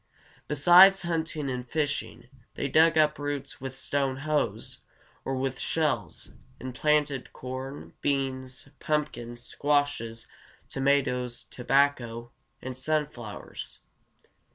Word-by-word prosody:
Besides 175 +6 +7
hunting 160 -3 -2
and 125 -1 -2
fishing, 145 -5 -2 0.3
they 140 - -1
dug 160 +3 +5
up 150 -1 +3
roots 145 -2 -4
with 135 0 -6
stone 135 -1 -1
hoes, 155 -1 -1 0.4
or 135 - -2
with 130 0 -2
shells, 130 - -1 0.3
and 130 0 -6
planted 150 -1 +1
corn, 130 +2 -7
beans, 130 -2 -2
pumpkins, 120 -6 -2
squashes, 145 -5 0 0.4
tomatoes, 130 -3 0
tobacco, 125 -3 0 0.3
and 130 0 -5
sunflowers. 130 -6 -4
135 Hz, 100 wpm, -28 LUFS, 125-150 Hz, 0.4 s, Besides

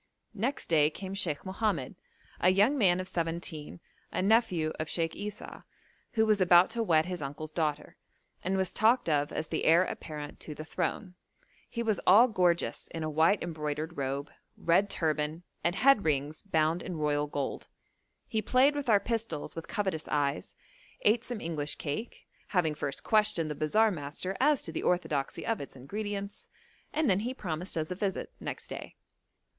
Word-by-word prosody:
Next 235 +7 -2
day 150 -3 +4
came 190 +4 -7
Sheikh 175 -6 -1
Mohammed, 190 - -1 0.4
a 180 - +5
young 205 +9 +4
man 185 -8 +4
of 185 - -3
seventeen, 165 - -3 0.3
a - - -2
nephew 195 -7 +2
of 155 0 -3
Sheikh 165 -1 -1
Esau, 210 0 -7 0.5
who 220 -1 +3
was 215 -2 +3
about 175 +2 +6
to 230 0 -1
wed 160 -7 +3
his 180 -2 -4
uncle's 145 +3 -5
daughter, 150 -2 -2 0.5
and 190 +1 0
was 190 -1 0
talked 225 +1 +3
of 145 -2 +1
as 155 - -3
the - - -1
heir 170 +3 +6
apparent 150 -5 -6
to 150 - -7
the 155 - -7
throne; 180 +3 -3 0.6
he 235 - -3
was 215 -4 +1
all 215 +7 +8
gorgeous 180 -6 +1
in 165 - -5
a 155 - -2
white 160 +6 +3
embroidered 155 0 -3
robe, 140 0 -3 0.3
red 190 +4 +3
turban, 155 +1 -1 0.2
and 175 +1 +1
head 265 -1 +5
rings 150 0 -1
bound 165 -3 +1
in 180 - -5
royal 150 -1 +1
gold. 145 -2 -4 0.6
He 220 -3 0
played 255 +6 +4
with 290 -3 -3
our 210 -2 +6
pistols 220 -7 -3
with 165 - -6
covetous 190 -6 -2
eyes, 145 -1 -1 0.5
ate 225 +3 +4
some 245 -3 -5
English 155 -5 -3
cake, 160 +11 -5 0.2
having 175 -6 +1
first 145 -2 -4
questioned 210 -8 +2
the - - -1
bazaar 215 +10 +3
master 165 +3 -4
as 290 0 +3
to 165 - -4
the 160 - -3
orthodoxy 155 -6 -1
of 225 -1 -1
its 140 - -9
ingredients, 200 +8 -5 0.4
and 315 -1 +1
then 190 -1 +4
he 245 +5 -3
promised 175 - -3
us 155 +2 -2
a - - -2
visit 195 0 -2
next - - -6
day. - - -8
175 Hz, 175 wpm, -30 LUFS, 155-210 Hz, 0.6 s, all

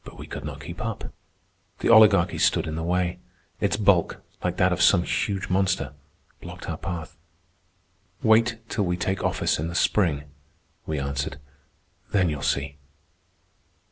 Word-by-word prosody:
But - - -12
we - - -8
could 70 - -7
not 75 0 -7
keep 85 +4 -7
up. 115 -2 -5 0.6
The - - -1
Oligarchy 105 -6 +6
stood - - +2
in 80 - -4
the 80 - -3
way. 90 +1 -1 0.4
Its 100 0 +1
bulk, 100 -5 +2 0.2
like 90 0 -1
that 90 0 +3
of 90 - -2
some 85 0 +5
huge 100 +1 -1
monster, 95 -6 0 0.5
blocked - - -9
our - - -3
path. 85 -1 -5 1.1
"Wait 115 +1 +4
till 105 -3 -1
we 90 0 -1
take 95 +2 -2
office - - 0
in 80 - -2
the 85 - -6
spring," 85 -8 +2 0.6
we 80 - -2
answered. 70 +1 -3 0.7
"Then 95 -4 +3
you'll 75 -2 -4
see." 70 +1 -1
90 Hz, 155 wpm, -25 LUFS, 80-100 Hz, 1.1 s, Oligarchy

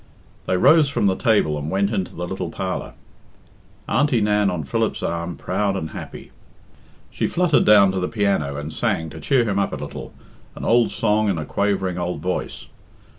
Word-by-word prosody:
They 90 - +1
rose 150 - +5
from 140 - 0
the 95 -1 +3
table 95 -9 +2
and 75 +1 -4
went 100 +3 0
into 95 -4 -3
the 85 - -4
little 90 -2 -4
parlour, 95 +2 -4 0.9
Auntie 135 -1 +2
Nan 105 -1 +2
on 90 -4 -3
Philip's 70 - -1
arm, 85 0 -3
proud 100 +2 -1
and 80 -5 -4
happy. - - -9 0.8
She - - -1
fluttered 180 -1 +2
down 100 -2 +6
to 95 - -2
the 90 - -1
piano 100 -10 0
and 75 +2 -6
sang, 80 -1 -1
to - - -9
cheer 135 -4 +2
him 100 -2 0
up 100 - -1
a - - -1
little, - - -7 0.4
an - - -6
old 120 0 +4
song 105 -1 +1
in 95 - 0
a 80 - -4
quavering 95 -2 -1
old 90 0 -3
voice. 90 0 -4
95 Hz, 185 wpm, -22 LUFS, 85-105 Hz, 0.9 s, down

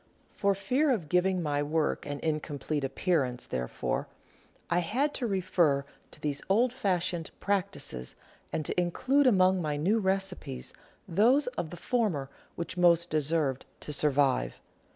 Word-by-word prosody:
For 200 -1 +1
fear 260 +10 +1
of 195 - 0
giving 180 +1 +2
my 145 -2 0
work 150 0 0
an 145 0 -4
incomplete 150 -2 -2
appear 150 +4 +1
ance, 125 -1 -5
therefore, 60 -1 -2 0.6
I 175 - +2
had 265 - 0
to 245 - -2
refer 170 -8 +2 0.2
to - - -14
these 145 -1 -2
old 235 +5 +3
fashioned 180 -8 -1
practices 185 - -2 0.4
and 155 - -2
to 180 - +1
include 260 +11 +2
among 185 -4 +4
my 150 -2 -1
new 195 +10 +2
recipes 190 - -2 0.3
those 235 - +4
of 160 - -3
the 175 - -8
former 175 - -1 0.2
which 170 +1 -5
most 170 -1 +4
deserved 150 -3 +1 0.2
to 150 - -4
survive. 140 - +2
170 Hz, 145 wpm, -29 LUFS, 145-195 Hz, 0.6 s, among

